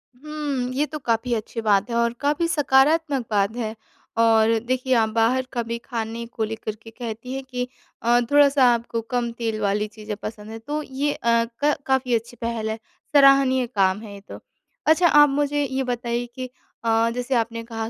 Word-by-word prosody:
हुँ, 285 -3 -4
ये 290 +3 +1
तो 305 0 -7
काफ़ी 235 0 0
अच्छी 225 +1 -3
बात 205 0 +2
है 235 - -2
और 235 0 +2
काफ़ी 295 +4 +1
सकारात्मक 290 -2 +2
बात 205 +2 +1
है। 225 -2 -3 0.5
और 225 0 +4
देखिए 255 0 0
आप 220 -2 +3
बाहर 235 +4 +1
का 240 -2 -1
भी 230 +1 -4
खाने 230 -1 -5
को 225 - -1
लेकर 215 -1 -4
के 225 - -12
कहती 230 +2 -7
हैं 270 0 -4
कि 250 -1 -3 0.3
अ, 240 +1 +4
थोड़ा-सा 285 -2 +5
आपको 230 0 -3
कम 235 +1 -2
तेल 225 -2 -3
वाली 205 +1 0
चीजें 215 0 -7
पसंद 215 0 -7
हैं 225 - -7
तो 295 +6 -4
ये 280 +2 -2
अ, 230 0 +1 0.2
क 295 0 +4
काफ़ी 260 -2 +1
अच्छी 230 +2 -4
पहल 230 -1 -2
है, 220 - -3 0.4
सराहनीय 275 -2 +5
काम 195 -4 +1
है 210 -2 -9
ये 200 - -11
तो। - - -8 0.5
अच्छा 340 +3 +5
आप 295 -2 +6
मुझे 290 +1 0
ये 265 0 -2
बताइए 240 -1 -2
कि 255 -1 -4 0.4
अ, 225 0 +2
जैसे 250 +1 -1
आपने 230 0 -1
कहा 225 -1 -5
235 Hz, 190 wpm, -23 LUFS, 225-270 Hz, 0.5 s, आप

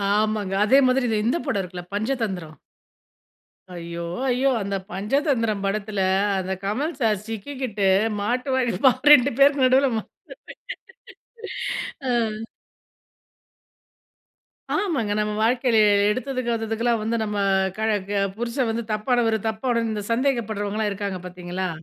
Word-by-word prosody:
ஆமாங்க. 215 -2 0
அதே 265 +6 +6
மாதிரி 255 0 +2
இத 220 - +1
இந்த 245 +9 +2
படம் 230 -9 0
இருக்குல்ல, 180 -1 -8
"பஞ்சதந்திரம்". 205 -9 -3 1.2
ஐயோ, 170 0 -6 0.2
ஐயோ! 260 +2 +2
அந்த 200 0 -2 0.2
பஞ்சதந்திரம் 225 - 0
படத்தில, 205 0 -2 0.4
அந்த 190 0 -2
கமல் 270 +12 -2
சார் 210 -3 +1
சிக்கிக்கிட்டு 225 -2 -3 0.3
மாட்டுவாறு 250 +2 0
பாரு 260 +3 +5
2 285 -1 +5
பேருக்கு 280 -1 +5
நடுவில 260 +2 +4
மா - - -1 2.1
அ. - - +1 2.7
ஆமாங்க. 305 - -1
நம்ம 210 0 0
வாழ்க்கையில 245 0 +2 0.3
எடுத்ததுக், 255 +3 -2
கவுத்ததுக்கெல்லாம் 230 0 0
வந்து 225 +2 -1
நம்ம 210 -1 -3 0.4
கழ 220 0 0 0.2
க - - -4 0.3
புருஷன் 240 +1 -1
வந்து 230 +1 -3
தப்பானவர 225 +1 +1
தப்பான 230 +2 0
இந்த 210 -1 -3
சந்தேகப்படுறவங்கலாம் 220 -5 0
இருக்காங்க 200 -2 -4
பார்த்தீங்களா, 180 +1 -4
225 Hz, 115 wpm, -23 LUFS, 205-255 Hz, 2.7 s, அதே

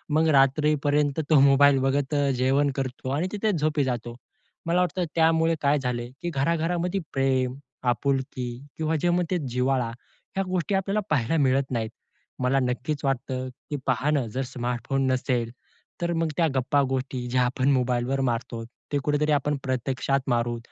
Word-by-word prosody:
मग 160 +1 +4
रात्रीपर्यंत 145 +1 +2
तो 155 -3 +6
मोबाईल 140 0 +6
बघत 135 +2 0
अ, 140 -1 +2
जेवण 135 +3 +2
करतो 130 -1 -4
आणि 175 +5 0
तिथे 210 +1 0
झोपी 155 -3 +1
जातो. 120 -2 -3 0.5
मला 170 +2 +2
वाटतं 180 +1 0
त्यामुळे 165 0 +3
काय 145 0 +3
झालं 120 -2 -2
की 175 - -2
घरा-घरामध्ये 170 +5 0
प्रेम, 130 -2 +1 0.3
आपुलकी 130 +1 0 0.3
किंवा 160 0 0
जे 175 - +2
मग 175 +1 +2
ते 180 - +2
जिव्हाळा 125 -1 +1 0.5
ह्या 195 - +1
गोष्टी 185 +1 -1
आपल्याला 195 +2 0
पाहायला 145 +3 +1
मिळत 135 -1 +3
नाहीत. 110 -2 -1 0.5
मला 135 +2 +3
नक्कीच 130 +4 -2
वाटतं 130 -1 -1 0.2
की 145 - -2
पहा 130 +3 +1
न 140 -5 +1
जर 130 +5 -3
स्मार्टफोन 125 +1 -2
नसेल, 125 -2 0 0.5
तर 170 0 0
मग 165 -1 0
त्या 165 -2 +4
गप्पा-गोष्टी, 130 -1 0
ज्या 125 0 +2
आपण 130 +2 +1
मोबाईलवर 125 +1 +1
मारतोत, 115 -2 -2 0.2
ते 145 - +1
कुठेतरी 150 +1 +1
आपण 145 0 +1
प्रत्यक्षात 130 +1 0
मारू. 120 0 +1
135 Hz, 155 wpm, -26 LUFS, 125-155 Hz, 0.5 s, तो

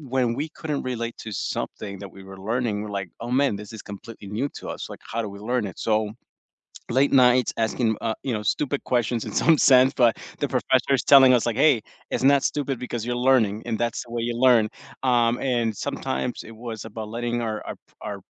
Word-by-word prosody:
when 125 -3 +2
we 150 - -2
couldn't 150 -3 -3
relate 115 -1 -4
to - - -5
something 100 +1 -4
that 100 -2 -9
we 95 - -11
were 95 0 -11
learning, 120 -3 0
we're 105 - -6
like, 95 - -7
"Oh 120 +1 -5
man, 135 -4 +2
this 105 +1 -10
is 110 - -7
completely 100 0 -10
new 115 +8 -1
to - - -8
us, - - -5
like, - - -10
how 115 - -1
do 110 - -4
we 100 0 -10
learn 120 +1 -1
it?" 95 - -10
So, 110 -1 0 0.8
late 135 +3 +3
nights 125 -1 +5
asking, 110 0 0
uh, 115 -1 0
you 130 - -1
know, 105 - -3
stupid 140 -1 -2
questions 120 -2 0
in - - -6
some 165 -2 +4
sense, 130 -1 +6
but 120 -3 +5 0.3
the - - 0
professor's 130 0 +1
telling 135 -2 +8
us 120 - +3
like, 120 -1 -1
"Hey, 135 -5 +5 0.3
it's - - -1
not 140 0 +5
stupid 140 -4 -1
because 120 -2 -4
you're 120 - -1 0.2
learning 110 -4 +3
and 115 -2 -2
that's 120 +1 -1
the 120 - -16
way 115 - -1
you 120 0 -2
learn," 115 -4 +5 0.3
um, 120 -2 +3
and 120 -5 0
sometimes 65 0 -3
it 115 - -11
was 110 -1 -5
about 110 -1 -7
letting 120 +1 -2
our 110 -2 -2
our - - -5
p - - -31 0.2
our - - -4
115 Hz, 225 wpm, -24 LUFS, 110-130 Hz, 0.8 s, telling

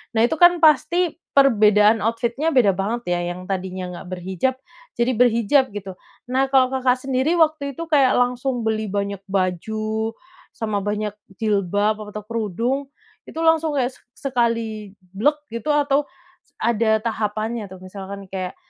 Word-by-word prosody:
Nah, 220 - +4
itu 310 +6 +1
kan 350 -1 +6
pasti 330 +3 +3 0.2
perbedaan 215 -5 +5
outfit-nya 235 +6 -1
beda 230 -6 +5
banget 205 +6 -2
ya, 175 - +1 0.2
yang 185 - -9
tadinya 185 -1 -4
enggak 175 - -9
berhijab 190 +8 -2 0.4
jadi 240 +1 +1
berhijab 245 +2 +3
gitu. 190 -2 -7 0.3
Nah, 265 +1 +2
kalau, 265 -1 +3
Kakak, 255 -1 +2
sendiri 270 +5 +1
waktu 310 -4 +1
itu 335 - -5
kayak 275 -4 +4
langsung 245 0 0
beli 220 -1 -1
banyak 200 0 -2
baju 215 +4 -2 0.4
sama 215 -4 -2
banyak 210 +1 -2 0.3
jilbab 205 0 +1
atau 210 0 -7
kerudung 230 +5 -2 0.4
itu - - -12
langsung 320 -2 +3
kayak 255 -2 +1
sek 260 +2 -9
sekali 225 -4 -1 0.2
blek 240 +10 +2 0.2
gitu 230 +6 -6
atau 285 0 +2 0.5
ada 220 -1 +2
tahapannya 220 0 -2
tuh? 190 - -9
Misalkan 195 +1 -8
kayak, 185 -1 -4
230 Hz, 145 wpm, -22 LUFS, 205-265 Hz, 0.5 s, kan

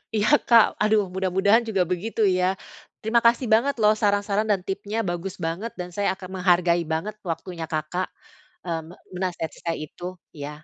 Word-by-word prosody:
Iya, 210 0 +2 0.2
Kak, 230 -2 +8 0.2
aduh 210 -1 +3
mudah-mudahan 190 +4 +3
juga 190 -4 +2
begitu 215 +5 -2
ya. 185 0 +2 0.4
Terima 230 +2 +2
kasih 235 +2 +4
banget 265 +6 +4
loh 210 0 +6
saran-saran 205 +1 +1
dan 200 - +2
tipsnya 200 +3 -4
bagus 175 +2 -4
banget, 185 +8 -3
dan 180 0 -4
saya 205 -1 +1
akan 185 - -9
menghargai 175 -1 +3
banget 195 +7 -2 0.2
waktunya 165 0 -5
Kakak, 160 +4 -2 0.6
eee, 165 -2 -2
me 175 - -12 0.2
menasihati 175 -4 -3
saya 165 -1 -1
itu, 175 +4 -11 0.3
ya. 145 -1 -6
190 Hz, 165 wpm, -24 LUFS, 175-215 Hz, 0.6 s, Kak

